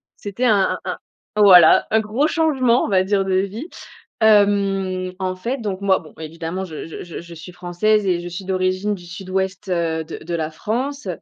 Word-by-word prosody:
C'était 205 +5 -4
un 205 -5 +2
un - - -3 0.4
un 210 - +2
voilà, 180 -5 +7
un 220 - +4
gros 220 +7 0
changement, 265 -7 +2
on - - -3
va 190 -3 +3
dire, 195 0 0
de 190 -1 0
vie. 200 - -2 0.5
Hem, 195 -3 +2
en 185 -1 -2
fait, 240 +8 -4
donc, 200 -3 -4
moi 195 -1 +3
bon 155 - -15
évidemment 165 +4 -5
je 160 -4 -7
je 165 - -8
je 175 - -8
je 170 0 -11
suis 160 +3 -10
française 180 +4 0
et 180 -2 +1
je 175 - -7
suis 175 +2 -7
d'origine 185 +2 0
du 175 -2 -13
Sud-Ouest, 190 +2 -4
heu, 165 -2 -1
de - - -7
de 170 +2 -6
la 160 -2 -2
France, 250 - -3
190 Hz, 200 wpm, -20 LUFS, 175-210 Hz, 0.5 s, voilà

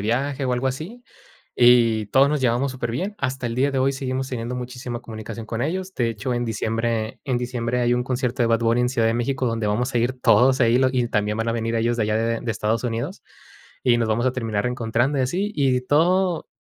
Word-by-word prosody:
viaje, 130 +6 -1
o, 125 - +1
algo 125 +2 0
así, 175 - -6 0.5
y 115 -3 +5
todos 135 +5 +4
nos 150 - 0
llevamos 130 +2 +1
superbién. 130 - -3
Hasta 130 -2 -3
el 115 - -3
día 135 +3 +2
de 135 - -1
hoy 135 +1 +2
seguimos 130 0 -3
teniendo 120 0 -4
muchísima 125 -1 -5
comunicación 110 -1 -7
con 115 +1 -4
ellos. 185 +6 -2
De 120 -2 0
hecho 115 +3 -3
en 120 0 -1
diciembre 115 0 -2
en 130 - +1
diciembre 125 0 -2
hay 120 0 +2
un 125 0 +1
concierto 125 -1 -1
de - - +3
Bad 115 0 +2
Bunny 115 +1 +2
en 125 - +2
Ciudad 115 -3 +1
de 115 - +2
México 130 +3 -1
donde 115 -2 -1
vamos 125 +6 0
a - - +3
ir 120 +3 0
todos 130 +1 +4
ahí 120 +2 +4
lo 130 0 +4
y 125 -2 0
también 105 -1 0
van 115 +1 -1
a - - +1
venir 115 0 -2
ellos 115 +1 0
de 110 - +2
allá 105 0 0
de 115 +1 0
de 120 - -3
Estados 110 +2 -1
Unidos, 120 - -3 0.6
y 120 -2 +3
nos 115 - 0
vamos 115 +3 +1
a 130 - +2
terminar 115 -5 -2
encontrando, 120 +3 0
y - - +2
así. 190 +11 -1
Y 130 -3 +1
todo 175 +6 +2
120 Hz, 235 wpm, -23 LUFS, 115-130 Hz, 0.6 s, y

